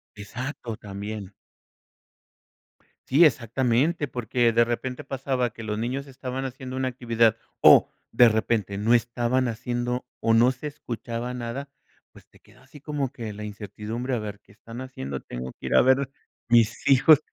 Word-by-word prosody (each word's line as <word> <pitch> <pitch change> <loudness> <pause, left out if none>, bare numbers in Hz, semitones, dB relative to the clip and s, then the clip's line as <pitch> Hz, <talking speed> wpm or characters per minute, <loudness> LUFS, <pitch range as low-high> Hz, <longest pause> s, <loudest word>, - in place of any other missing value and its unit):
Exacto, 115 +3 -6
también. 100 0 -7 1.7
Sí, 150 +6 +6
exactamente, 130 +4 +1
porque 120 -1 +1
de 120 +1 +5
repente 125 +2 -3
pasaba 130 -2 -1
que 115 - -11
los 105 -1 -3
niños 130 +5 -3
estaban 130 0 -5
haciendo 130 0 -6
una 130 0 0
actividad, 115 -3 +2 0.2
o - - +7 0.2
de 120 -1 +7
repente 110 -2 0
no 110 +4 +2
estaban 120 +1 +1
haciendo 120 +2 -3 0.2
o 115 - +3
no 120 +3 +5
se 130 +4 -7
escuchaba 120 -3 -5
nada, 125 +3 -5 0.4
pues, - - -17
te - - -22
queda - - -22
así 140 +3 -15
como 145 -3 -3
que 110 -3 -6
la 105 +1 -8
incertidumbre, 105 +4 -4
a - - -1
ver, 105 -2 -6
¿qué 100 - -22
están 115 +3 -10
haciendo? 70 - -5
Tengo 65 +1 -7
que - - -10
ir - - 0
a - - +8
ver 130 +1 +3 0.4
mis 115 -1 +3
hijos. 140 +2 +7
120 Hz, 160 wpm, -25 LUFS, 110-130 Hz, 1.7 s, a